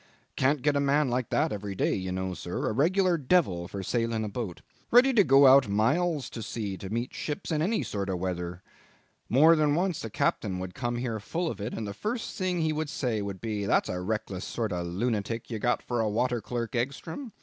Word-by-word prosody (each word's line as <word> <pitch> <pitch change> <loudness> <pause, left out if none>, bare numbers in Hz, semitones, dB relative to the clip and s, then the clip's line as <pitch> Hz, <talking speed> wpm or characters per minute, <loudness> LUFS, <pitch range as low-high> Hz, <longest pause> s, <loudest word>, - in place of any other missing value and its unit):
Can't 135 0 +1
get 150 -1 +3
a - - +3
man 140 0 +2
like 125 -1 -1
that - - +1
every 100 -1 -4
day, - - +1
you 95 -1 -3
know, 95 0 -2
sir; 85 +1 -4
a - - +1
regular 175 - +2
devil 125 - +2
for 95 +1 -6
sailing 115 +1 0
a 105 - -3
boat; 100 -5 -5 0.3
ready 255 +3 +6
to 215 -4 +6
go 135 -2 +6
out 130 -3 +7
miles 140 - +1
to 115 - -6
sea 105 -2 -4
to 95 - -7
meet 120 +4 -3
ships 150 +2 -4
in 155 -1 +1
any 215 +7 +1
sort 100 -1 -3
of 95 - -1
weather. 90 -1 -4 0.7
More 155 +8 +6
than 150 -2 +2
once 180 -1 0
a 115 - -4
captain 100 -2 0
would 90 0 -5
come 120 -1 -2
in 120 - -3
here 115 -4 -2
full 165 - -2
of - - -8
it, 105 +4 -4
and 110 - -4
the 100 - -5
first 225 - -4
thing 185 -3 -1
he 160 -1 +1
would 155 0 -2
say 120 -7 -1
would 100 -2 -5
be, 105 -3 -2
'That's - - +2
a 90 0 -3
reckless 100 -1 -3
sort 110 -3 -3
of 85 -1 -2
a - - -5
lunatic 115 +4 -2
you've 110 -2 -4
got 120 - +1
for 120 -2 -1
water 120 +2 0
clerk, 120 +1 -4
Egstrom. 140 - -3
120 Hz, 230 wpm, -28 LUFS, 100-150 Hz, 0.7 s, out